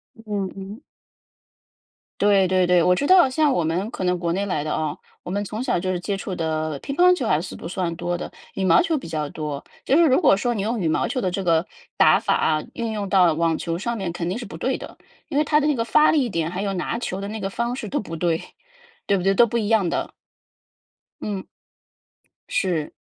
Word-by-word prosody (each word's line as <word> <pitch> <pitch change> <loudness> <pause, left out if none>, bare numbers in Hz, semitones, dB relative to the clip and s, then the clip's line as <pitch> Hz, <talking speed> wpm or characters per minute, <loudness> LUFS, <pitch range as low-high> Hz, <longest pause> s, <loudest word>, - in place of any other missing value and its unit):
嗯 210 -4 -4
嗯。 195 +5 -8 1.4
对 200 -2 +4
对 185 -1 +3
对， 180 -1 +4
我 180 - +4
知 280 +10 0
道 365 -7 +6
像 295 +1 +2
我 175 - +1
们 175 +7 -1
可 185 - -5
能 180 0 +1
国 170 -1 -1
内 195 +3 -1
来 180 -7 -1
的 155 +1 -2
哦， 155 -1 -3 0.2
我 - - -6
们 205 +2 -1
从 215 +4 -4
小 220 - 0
就 185 +1 -3
是 185 - 0
接 195 +2 -2
触 190 -1 -5
的 155 -2 -2
乒 275 - -5
乓 360 +1 +6
球 265 - -3
还 150 - +2
是 180 - -7
不 - - -10
算 175 -1 -2
多 175 +1 -2
的， - - -6 0.3
羽 190 - -1
毛 165 - +6
球 330 -3 0
比 265 - -7
较 155 -3 -3
多。 150 -2 -5 0.2
就 270 - +3
是 340 - +6
如 265 -2 +4
果 270 - +6
说 240 +4 -1
你 210 - -2
用 220 +2 -1
羽 165 - +1
毛 - - +1
球 255 - -2
的 185 - 0
这 195 - -2
个 165 0 +3 0.3
打 - - +5
法 - - +1
啊， 155 -1 +1
运 230 -1 -3
用 210 -2 -3
到 185 -3 +4
网 165 0 +1
球 170 0 -3
上 235 +4 -2
面 190 -4 -3
肯 170 0 -4
定 185 +5 -2
是 240 - -6
不 - - -9
对 - - -1
的， - - -10 0.3
因 285 - -2
为 300 - +3
它 300 0 +3
的 295 - +1
那 300 - +3
个 230 -2 -1
发 305 +5 +5
力 280 -6 +2
点， 165 -3 -2
还 185 +2 -3
有 200 -1 -1
拿 190 +5 -2
球 195 -5 -4
的 200 - -5
那 220 +1 -5
个 195 -1 -3
方 235 +4 -2
式 245 -4 -5
都 - - -2
不 165 -5 -7
对。 165 -1 0 0.6
对 200 - +2
不 180 - -3
对？ 195 +1 +3
都 235 +4 +5
不 235 - -1
一 215 -3 -1
样 215 -6 +3
的。 - - -3 1.1
嗯。 200 -3 -3 1.1
是。 180 - -1
195 Hz, 265 characters per minute, -23 LUFS, 170-230 Hz, 1.4 s, 道